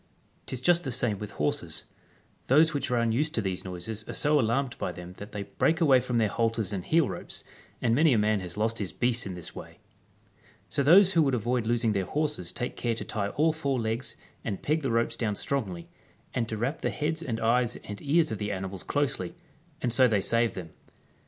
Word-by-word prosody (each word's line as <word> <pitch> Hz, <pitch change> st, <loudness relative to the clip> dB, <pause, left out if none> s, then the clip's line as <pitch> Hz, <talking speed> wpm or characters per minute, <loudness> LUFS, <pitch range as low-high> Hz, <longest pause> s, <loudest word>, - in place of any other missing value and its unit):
'Tis 130 Hz, -, -3 dB
just 175 Hz, +3 st, +4 dB
the 135 Hz, -, -3 dB
same 120 Hz, -5 st, 0 dB
with 105 Hz, -, -5 dB
horses. 75 Hz, -, -1 dB, 0.6 s
Those 155 Hz, +5 st, +5 dB
which 145 Hz, -, -2 dB
are 125 Hz, -, +1 dB
unused 120 Hz, +7 st, +1 dB
to -, -, +1 dB
these 95 Hz, -2 st, -2 dB
noises 95 Hz, +4 st, -5 dB
are -, -, -4 dB
so 150 Hz, 0 st, +3 dB
alarmed 125 Hz, +2 st, 0 dB
by -, -, -2 dB
them 90 Hz, 0 st, -9 dB
that 105 Hz, +1 st, -9 dB
they 105 Hz, -1 st, -4 dB
break 160 Hz, -, +1 dB
away 140 Hz, -6 st, +6 dB
from 125 Hz, -1 st, -2 dB
their 110 Hz, -2 st, +3 dB
halters 115 Hz, -1 st, 0 dB
and 95 Hz, -3 st, -3 dB
heel 160 Hz, -, +3 dB
ropes, -, -, -7 dB, 0.4 s
and 115 Hz, -, +3 dB
many 155 Hz, +5 st, +5 dB
a 120 Hz, -, +4 dB
man 105 Hz, 0 st, +2 dB
has 90 Hz, 0 st, -8 dB
lost 110 Hz, +1 st, 0 dB
his 100 Hz, -3 st, -3 dB
beasts 120 Hz, -2 st, +1 dB
in 95 Hz, -, -5 dB
this 90 Hz, -, -6 dB
way. -, -, -10 dB, 0.9 s
So -, -, 0 dB
those 185 Hz, +7 st, +7 dB
who 165 Hz, -, +5 dB
would 135 Hz, -4 st, +2 dB
avoid 120 Hz, 0 st, 0 dB
losing 115 Hz, -1 st, +2 dB
their 100 Hz, -2 st, 0 dB
horses 150 Hz, -, -1 dB
take 120 Hz, -, -4 dB
care 120 Hz, -1 st, -1 dB
to -, -, -5 dB
tie 100 Hz, -2 st, -2 dB
all 155 Hz, +7 st, +2 dB
four 140 Hz, -5 st, -1 dB
legs 115 Hz, +2 st, -2 dB, 0.3 s
and 100 Hz, -4 st, -4 dB
peg 155 Hz, +2 st, +1 dB
the 135 Hz, -, -1 dB
ropes 115 Hz, 0 st, +1 dB
down 110 Hz, -3 st, -1 dB
strongly, 95 Hz, -10 st, -2 dB, 0.5 s
and 115 Hz, -2 st, -1 dB
to 110 Hz, -, -3 dB
wrap 130 Hz, +8 st, -2 dB
the -, -, 0 dB
heads 160 Hz, +2 st, -2 dB
and 120 Hz, -8 st, -3 dB
eyes 120 Hz, +1 st, +2 dB
and 105 Hz, -1 st, -8 dB
ears 160 Hz, +1 st, +2 dB
of 110 Hz, -, -3 dB
the 105 Hz, -1 st, -2 dB
animals 95 Hz, -1 st, -4 dB
closely, 145 Hz, +3 st, -1 dB, 0.5 s
and 120 Hz, -2 st, +1 dB
so 130 Hz, 0 st, +6 dB
they 110 Hz, -4 st, +2 dB
save 115 Hz, +1 st, +2 dB
them. 85 Hz, -4 st, -7 dB
115 Hz, 220 wpm, -28 LUFS, 105-140 Hz, 0.9 s, those